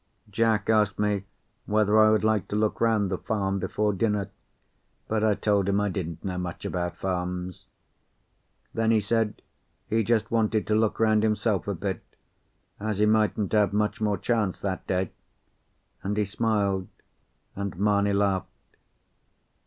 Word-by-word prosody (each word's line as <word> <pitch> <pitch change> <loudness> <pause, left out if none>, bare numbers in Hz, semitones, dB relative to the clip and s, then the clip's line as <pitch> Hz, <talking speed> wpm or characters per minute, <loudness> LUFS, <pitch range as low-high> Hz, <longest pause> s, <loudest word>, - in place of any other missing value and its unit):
Jack 110 0 +1
asked 105 -3 +2
me 105 -2 0 0.4
whether 105 0 +3
I 110 0 +7
would 110 -1 +2
like 110 -2 +1
to - - -4
look 105 0 0
round 110 -4 +2
the 95 - -2
farm 100 -2 -1
before 105 +3 0
dinner, 105 -1 -1 0.8
but 110 -1 0
I 110 -2 +3
told 100 -2 +1
him 100 +1 +2
I 105 0 +1
didn't 85 -3 -5
know 90 -1 -2
much 90 -2 -5
about 90 -1 -3
farms. 90 -1 -4 1.1
Then 115 0 +1
he 115 -1 +4
said 105 0 -1 0.4
he 110 +1 +1
just 115 0 +1
wanted 110 -1 +1
to 110 - 0
look 110 -1 +1
round 110 -1 +4
himself 105 -3 0
a 100 - -1
bit, 95 +2 -3 0.8
as 105 -1 -2
he 105 - +3
mightn't 105 -1 +2
have 105 -2 +3
much 105 +1 0
more 105 -2 +1
chance 105 -2 0
that 95 -2 -3
day; 95 -1 -1 0.9
and 100 +2 -2
he 105 - +2
smiled, 100 -2 0 0.7
and 100 -3 -4
Mamie 100 0 +2
laughed. 100 -2 +1
105 Hz, 155 wpm, -26 LUFS, 95-110 Hz, 1.1 s, I